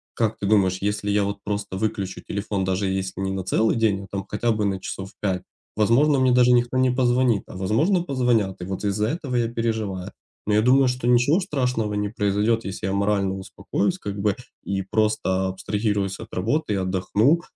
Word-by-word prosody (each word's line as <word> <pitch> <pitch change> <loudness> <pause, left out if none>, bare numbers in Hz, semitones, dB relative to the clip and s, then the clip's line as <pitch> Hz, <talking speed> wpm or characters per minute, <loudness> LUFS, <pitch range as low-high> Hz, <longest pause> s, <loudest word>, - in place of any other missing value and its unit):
как 110 -1 0
ты - - -4
думаешь, 95 -3 +3
если 105 +1 -1
я 105 0 +2
вот 100 0 -3
просто 105 -2 -3
выключу 100 -2 -2
телефон, 100 -1 -3
даже 95 +1 0
если 95 0 -3
не 95 - -1
на 95 -1 -3
целый 110 +4 +2
день, 105 -4 +1
а - - -11
там 100 -1 -3
хотя 115 +3 0
бы 105 -2 0
на 95 -1 -1
часов 95 +1 -6
5, 95 -3 0 0.3
возможно 130 +7 +3
мне 130 -1 +4
даже 125 0 +5
никто 120 +1 +2
не 130 0 +3
позвонит, 125 -3 +2
а - - -10
возможно 155 - +2
позвонят. 120 - 0
И - - -4
вот 95 +2 -5
из-за 105 +1 0
этого 145 -5 -3
я 120 -1 +2
переживаю. 110 -5 -2 0.3
Но 105 - 0
я 105 - +4
думаю, 130 +3 +5
что 125 -1 -1
ничего 125 +8 +4
страшного 125 - -1
не 105 0 -1
произойдет, 105 +2 0
если 95 0 -5
я 95 - -1
морально 100 -1 +1
упокоюсь 100 - -2
как 100 - -5
бы 100 0 +1 0.3
и 95 0 -2
просто 95 -2 0
абстрагируюсь 100 +1 -2
от - - -10
работы 115 - 0
и - - +1
отдохну. 95 - +2
105 Hz, 200 wpm, -23 LUFS, 95-120 Hz, 0.3 s, даже